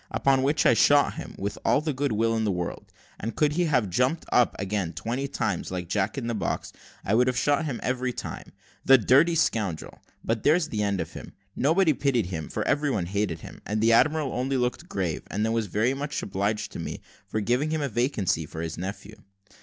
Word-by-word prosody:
Upon 135 Hz, -1 st, +2 dB
which 145 Hz, +3 st, +1 dB
I -, -, +6 dB
shot 145 Hz, +5 st, +4 dB
him, -, -, -8 dB
with 100 Hz, +2 st, -4 dB
all -, -, +3 dB
the 155 Hz, 0 st, -2 dB
good 140 Hz, +1 st, -1 dB
will 115 Hz, +1 st, +1 dB
in 110 Hz, -, 0 dB
the 105 Hz, -, +1 dB
world, 90 Hz, -2 st, -4 dB, 0.3 s
and 115 Hz, +3 st, -4 dB
could 150 Hz, -1 st, +2 dB
he 175 Hz, +2 st, +1 dB
have 125 Hz, -9 st, +2 dB
jumped 125 Hz, -, +1 dB
up 125 Hz, -, +3 dB
again 100 Hz, -3 st, -2 dB
twenty 115 Hz, -, -3 dB
times, -, -, -2 dB
like 90 Hz, -2 st, -4 dB
Jack 100 Hz, +6 st, 0 dB
in 130 Hz, -, -3 dB
the 120 Hz, -, -1 dB
box, 105 Hz, -, -3 dB, 0.3 s
I 100 Hz, -, 0 dB
would 125 Hz, +3 st, +4 dB
have 125 Hz, -1 st, 0 dB
shot 145 Hz, +3 st, +2 dB
him 135 Hz, -6 st, -3 dB
every 125 Hz, 0 st, -1 dB
time. -, -, -7 dB, 0.3 s
The 135 Hz, -, +7 dB
dirty 140 Hz, -, +4 dB
scoundrel! 110 Hz, -, -1 dB, 0.2 s
but 115 Hz, -1 st, -1 dB
there's 160 Hz, +3 st, +3 dB
an 110 Hz, -, -3 dB
end 100 Hz, -3 st, 0 dB
of 80 Hz, -, -6 dB
him. -, -, -9 dB, 0.2 s
Nobody 160 Hz, +4 st, +3 dB
pitied 125 Hz, -4 st, +1 dB
him, 80 Hz, -4 st, -5 dB
for -, -, -3 dB
every 145 Hz, +1 st, +1 dB
one 105 Hz, -10 st, 0 dB
hated 95 Hz, -3 st, -2 dB
him; -, -, -11 dB
and 105 Hz, +1 st, -2 dB
the 115 Hz, +1 st, +4 dB
admiral 150 Hz, +3 st, +3 dB
only 130 Hz, +2 st, -1 dB
looked 125 Hz, +8 st, -2 dB
grave, 90 Hz, -5 st, -2 dB
and 105 Hz, +2 st, -1 dB
then 110 Hz, -, 0 dB
was 115 Hz, -2 st, 0 dB
very 110 Hz, +7 st, +1 dB
much 145 Hz, +2 st, -4 dB
obliged 100 Hz, +2 st, -2 dB
to -, -, -7 dB
me -, -, -5 dB, 0.3 s
for 110 Hz, -, -2 dB
giving 125 Hz, +8 st, +1 dB
him 155 Hz, -1 st, -1 dB
a -, -, 0 dB
vacancy 110 Hz, -, 0 dB
for 80 Hz, -, -6 dB
his 80 Hz, 0 st, -5 dB
nephew. 100 Hz, +3 st, -7 dB
115 Hz, 225 wpm, -26 LUFS, 100-140 Hz, 0.3 s, The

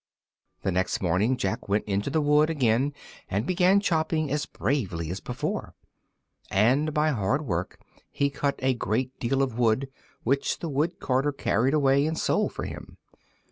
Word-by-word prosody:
The 95 Hz, -, +1 dB
next 90 Hz, +1 st, 0 dB
morning 100 Hz, +8 st, +1 dB
Jack 95 Hz, -3 st, -3 dB
went 105 Hz, +2 st, +1 dB
to 100 Hz, +4 st, -1 dB
the 155 Hz, +3 st, +1 dB
wood 150 Hz, +1 st, +4 dB
again, 130 Hz, -2 st, +2 dB, 0.4 s
and 100 Hz, +5 st, -1 dB
began 185 Hz, +3 st, +4 dB
chopping 160 Hz, -5 st, 0 dB
as 145 Hz, 0 st, -1 dB
bravely 90 Hz, -, -2 dB
as 95 Hz, -, -4 dB
before. -, -, -4 dB, 0.7 s
And 130 Hz, +10 st, +3 dB
by 150 Hz, +1 st, +2 dB
hard 130 Hz, +5 st, 0 dB
work 90 Hz, -5 st, -3 dB, 0.3 s
he 140 Hz, 0 st, 0 dB
cut 140 Hz, 0 st, -1 dB
a 130 Hz, 0 st, +3 dB
great 125 Hz, +2 st, -2 dB
deal 135 Hz, +3 st, +1 dB
of 125 Hz, -3 st, -3 dB
wood, 120 Hz, +3 st, +2 dB, 0.3 s
which 135 Hz, +4 st, +1 dB
the 170 Hz, -, -5 dB
wood 150 Hz, +4 st, -1 dB
carter 135 Hz, +2 st, +1 dB
carried 135 Hz, 0 st, +1 dB
away 140 Hz, 0 st, +3 dB
and 160 Hz, 0 st, -2 dB
sold -, -, +1 dB
for -, -, -6 dB
him. -, -, -9 dB
135 Hz, 165 wpm, -26 LUFS, 110-150 Hz, 0.7 s, wood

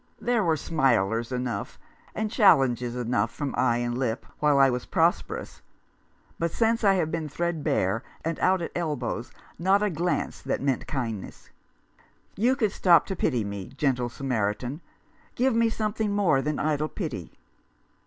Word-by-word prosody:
There 230 Hz, 0 st, +1 dB
were 160 Hz, -3 st, +2 dB
smilers 120 Hz, -7 st, +1 dB
enough, 125 Hz, -1 st, -3 dB, 0.4 s
and 215 Hz, -1 st, -2 dB
challenges 125 Hz, -, +4 dB
enough 120 Hz, -3 st, 0 dB
from 145 Hz, +1 st, -4 dB
eye 120 Hz, -2 st, +2 dB
and 120 Hz, 0 st, -2 dB
lip 125 Hz, -1 st, -2 dB
while 150 Hz, -1 st, +3 dB
I 135 Hz, 0 st, +7 dB
was 125 Hz, -1 st, -2 dB
prosperous; -, -, 0 dB, 0.8 s
but 170 Hz, -, +1 dB
since 225 Hz, +5 st, +1 dB
I 195 Hz, -2 st, +5 dB
have 160 Hz, -4 st, 0 dB
been 160 Hz, -2 st, -3 dB
threadbare 145 Hz, -, 0 dB, 0.2 s
and 165 Hz, 0 st, -2 dB
out 185 Hz, -1 st, +2 dB
at -, -, -4 dB
elbows 145 Hz, -8 st, -3 dB, 0.3 s
not 190 Hz, +4 st, +3 dB
a 210 Hz, -, +1 dB
glance 175 Hz, +2 st, -2 dB
that -, -, -2 dB
meant 135 Hz, -2 st, -1 dB
kindness. 115 Hz, -8 st, -5 dB, 0.8 s
You 245 Hz, +6 st, +2 dB
could 220 Hz, -7 st, +1 dB
stop 175 Hz, -5 st, +5 dB
to 190 Hz, -, -4 dB
pity 125 Hz, -9 st, 0 dB
me, 100 Hz, -2 st, -5 dB
gentle 125 Hz, -4 st, +1 dB
Samaritan. 120 Hz, +3 st, -2 dB, 0.5 s
Give 255 Hz, +1 st, +2 dB
me 230 Hz, 0 st, +3 dB
something 215 Hz, -1 st, -1 dB
more 180 Hz, -10 st, +3 dB
than 150 Hz, +1 st, -2 dB
idle 155 Hz, 0 st, 0 dB
pity." 155 Hz, -, -5 dB
150 Hz, 155 wpm, -26 LUFS, 120-190 Hz, 0.8 s, I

